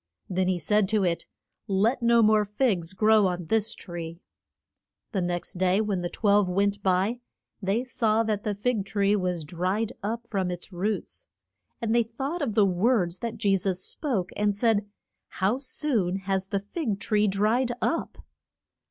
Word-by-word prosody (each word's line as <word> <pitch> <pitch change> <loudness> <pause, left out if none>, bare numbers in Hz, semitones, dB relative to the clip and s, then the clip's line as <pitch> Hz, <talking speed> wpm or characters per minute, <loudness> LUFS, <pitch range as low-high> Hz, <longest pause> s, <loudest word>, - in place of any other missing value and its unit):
Then 185 0 0
he 185 -1 +1
said 195 +4 +2
to 215 -2 +2
it, 170 -2 -1 0.4
Let 210 +6 +1
no 235 -1 +5
more 215 0 +5
figs 205 -5 0
grow 215 +1 +4
on 180 -1 -3
this 220 +5 0
tree. 170 -2 -7 0.9
The 195 -5 -1
next 175 0 -3
day 185 +1 +3
when 205 -4 0
the 175 - -2
twelve 205 -2 +2
went 200 +2 +1
by 195 +5 +1 0.4
they 200 +5 0
saw 225 -3 +1
that 215 -2 -1
the 210 -1 -1
fig 220 0 0
tree 200 +1 +1
was 180 -4 -1
dried 185 +8 -1
up 230 +3 -3
from 195 -5 -1
its 180 +2 -6
roots. 210 - -3 0.5
And 225 -1 0
they 235 - +5
thought 270 +9 -4
of 235 -8 -1
the 210 - +5
words 185 -1 +1
that 230 -1 -4
Je 205 -3 +2
sus 185 -1 0
spoke, 210 - -2
and 205 -1 +1
said, 205 -1 +1 0.4
How 195 +8 0
soon 255 - 0
has 190 0 -1
the 200 0 -1
fig 210 - -3
tree 210 -1 +2
dried 215 +6 +1
up! 330 - -2
205 Hz, 170 wpm, -26 LUFS, 185-225 Hz, 0.9 s, no